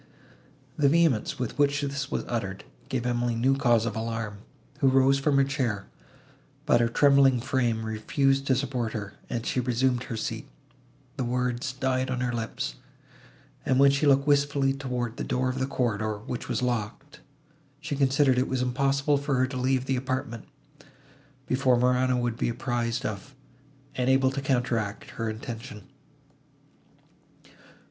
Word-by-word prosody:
The 140 -2 +5
vehemence, 160 -8 +2
with 125 +2 -4
which 145 0 +3
this 140 -1 -3
was - - -2
uttered, 100 -5 -3 0.3
gave 125 -2 -2
Emily 120 -1 0
new 130 +4 +2
cause 120 -4 +3
of 115 - -3
alarm, 110 -2 -4 0.4
who 135 -3 +4
arose 135 +1 +4
from 140 0 +2
her 140 - +5
chair, 130 -8 -2 0.8
but 120 - +4
her 120 - +3
trembling 140 0 +5
frame 120 -3 0
refused 135 +5 0
to 130 - +4
support 125 -4 -2
her, 100 -3 -5 0.2
and 120 0 -3
she - - 0
resumed 125 0 +1
her 115 - -5
seat;—the 85 - -8
words 125 +1 -1
died 130 0 -1
on 130 -1 -2
her 125 -1 -1
lips, 110 - -4 0.9
and, 130 0 +2
when 140 0 +7
she 140 +2 +1
looked 140 0 +4
wistfully 140 -1 +2
towards 125 -4 -4
the - - -3
door 130 +1 0
of 130 +1 -3
the 130 - 0
corridor, 110 -5 -1
which 115 +3 -6
was - - -1
locked, 120 +3 -3 0.6
she 150 -1 -4
considered 135 -1 +3
it 130 - +1
was 130 -1 0
impossible 140 +3 +1
for 140 -1 -1
her 130 0 +3
to 130 +1 -7
leave 130 0 +1
the 135 - 0
apartment, 130 -3 -3 1.0
before 130 -1 +2
Morano 125 +1 +2
would 120 -2 -1
be - - 0
apprised 120 +1 -2
of, 110 +6 -5 0.6
and 125 0 0
able 130 0 +4
to 140 +1 -3
counteract, 120 -6 -1
her 115 -1 -3
intention. 115 0 -7
130 Hz, 155 wpm, -27 LUFS, 115-135 Hz, 1.0 s, when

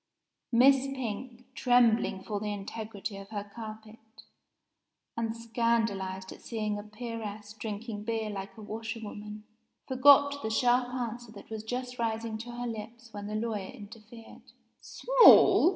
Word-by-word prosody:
Miss 265 +3 +5
Pink, 250 -1 -5
trembling 235 -6 +3
for 210 -1 -3
the 210 - -4
integrity 205 0 -6
of 195 0 -10
her 205 -2 -4
carpet, 220 -1 -9 1.2
and 230 0 -2
scandalized 225 -5 -1
at - - -11
seeing 215 -3 -3
a - - -5
peeress 215 -1 -7
drinking 215 0 -5
beer 220 -1 -2
like 195 +2 -7
a 215 - -9
washer 220 +2 -5
woman, 210 0 -8 0.4
forgot 285 +2 +6
the 220 - -2
sharp 245 +2 +2
answer 240 -2 -4
that 205 - -13
was 220 -1 -5
just 250 +2 -4
rising 225 -1 -2
to 235 +2 -7
her 245 0 -5
lips 230 +1 -7
when 205 0 -6
the 210 - -4
lawyer 215 -3 -2
interfered. 225 0 -12 0.4
"Small!" - - +7
225 Hz, 140 wpm, -30 LUFS, 210-240 Hz, 1.2 s, Small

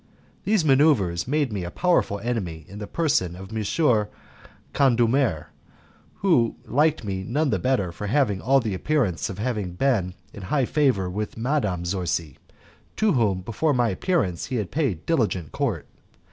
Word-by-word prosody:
These 205 -6 +2
manoeuvres 130 - +3
made 145 -3 0
me 95 -3 -3
a 85 - -4
powerful 175 - +1
enemy 90 -10 -3
in 100 +2 -10
the 105 - -6
person 115 - 0
of 95 +4 -9
M. 110 0 +1 0.7
Condulmer, 120 - +2 0.7
who 150 -12 +2
liked 150 +1 +2
me 95 -2 -3
none 140 +7 0
the - - +1
better 125 -9 0
for 95 +5 -6
having 105 -5 +1
all 135 +3 +4
the 110 -5 -2
appearance 105 - 0
of 95 - -5
being 105 -2 -1 0.2
in 105 - -9
high 130 +8 0
favour 130 -10 +1
with 105 +5 -4
Madame 115 - -1
Zorzi, 85 -5 -2 0.6
to 215 -1 +2
whom 105 -8 +1
before 125 - 0
my 120 -2 +2
appearance 100 - -1
he 130 - -3
had 105 -6 -2
paid 130 - -1
diligent 105 - 0
court. - - -2
110 Hz, 155 wpm, -24 LUFS, 95-140 Hz, 0.7 s, all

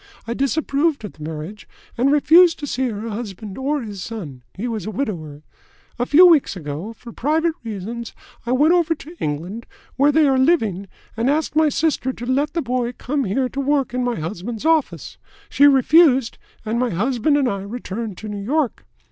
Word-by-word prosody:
I 230 - -3
disapproved 280 +2 0
of 210 - -8
the 155 - -18
marriage, 160 +7 -7 0.3
and 260 +3 +2
refused 330 +4 +6
to 295 - -5
see 260 -2 -1
her 220 +1 -5
husband 205 -2 -6
or 280 +1 -2
his 205 -4 -7
son 175 - -7
he 225 +6 -4
was 220 -5 -4
a - - -2
widower. 165 - -5 0.6
A 245 - 0
few 340 +5 +7
weeks 325 - +4
ago, 160 +4 -6
for 235 +1 -12
private 315 +7 0
reasons, 225 +2 -6 0.3
I 240 - -3
went 300 +6 +4
over 335 -2 +2
to 320 +3 -12
England, 170 +10 -4 0.3
where 285 +2 +4
they 305 0 +4
are 265 -1 +3
living, 220 - +1 0.3
and 230 +3 0
asked 300 0 0
my 310 0 +4
sister 295 -4 0
to 240 - -8
let 275 +4 0
the 335 -2 -1
boy 245 -1 -1
come 275 +2 -2
here 255 +7 0
to 275 - -6
work 275 -2 0
in 250 0 -1
my 245 -5 -1
husband's 205 - -5
office. 320 -3 0 0.3
She 285 - +5
refused, 270 -2 +4 0.3
and 225 +2 -1
my 250 0 +1
husband 245 - +1
and 275 -3 +2
I 200 -4 -2
returned 210 -1 -6
to 215 - -8
New 205 -1 -5
York. 280 +2 -1
245 Hz, 190 wpm, -21 LUFS, 210-290 Hz, 0.6 s, few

